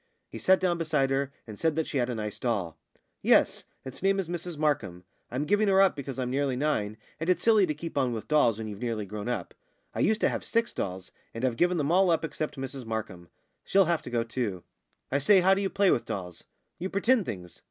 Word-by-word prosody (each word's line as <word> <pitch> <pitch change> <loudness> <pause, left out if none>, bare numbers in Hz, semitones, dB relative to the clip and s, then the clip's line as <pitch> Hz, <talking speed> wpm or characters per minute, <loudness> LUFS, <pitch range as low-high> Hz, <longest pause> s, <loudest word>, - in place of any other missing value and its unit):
He - - -7
sat 190 0 +4
down 175 -2 0
beside 150 -5 +1
her, 135 0 0
and 110 -3 -10
said 160 -2 +1
that 160 -1 0
she 140 - -2
had 120 0 0
a 120 - -2
nice 105 -2 -5
doll. 100 -10 -1 0.5
"Yes; - - +3 0.2
its 130 0 -8
name 195 +1 +3
is 190 -3 -1
Mrs 175 -1 -5
Markham. 145 - -1 0.3
I'm 130 +5 -2
giving 205 +4 +2
her 195 -1 +4
up, 195 -2 +5
because 140 -2 -6
I'm 125 -1 -2
nearly 135 -1 0
nine, 110 -7 -1 0.2
and 165 +3 -2
it's 185 - +2
silly 215 -4 +5
to 150 - -2
keep 165 +3 -7
on 130 -2 +1
with 115 -2 -5
dolls 135 -8 +3
when 110 -1 -5
you're 105 -2 -7
nearly 115 -3 -2
grown 105 +3 -5
up. 105 -8 -3 0.4
I - - -5
used 220 0 +2
to - - +4
have - - -3
six 230 0 0
dolls, 95 -1 -4 0.2
and 115 +3 -1
I've 125 -3 0
given 175 +7 +2
them 150 0 0
all 185 +1 +4
up 165 -1 +2
except 155 -2 -4
Mrs 135 0 -5
Markham. 105 -6 -5 0.3
She'll 195 0 +4
have 170 -1 +1
to - - -8
go 120 -1 0
too." 115 -6 -3 0.5
"I 140 - +2
say, 190 +7 +5
how 190 +2 +5
do 195 - 0
you 195 - 0
play 195 -1 +3
with - - +1
dolls?" 90 -3 -6 0.3
"You 185 +2 -3
pretend 225 +2 +2
things. 90 -2 -7
140 Hz, 240 wpm, -28 LUFS, 115-175 Hz, 0.5 s, up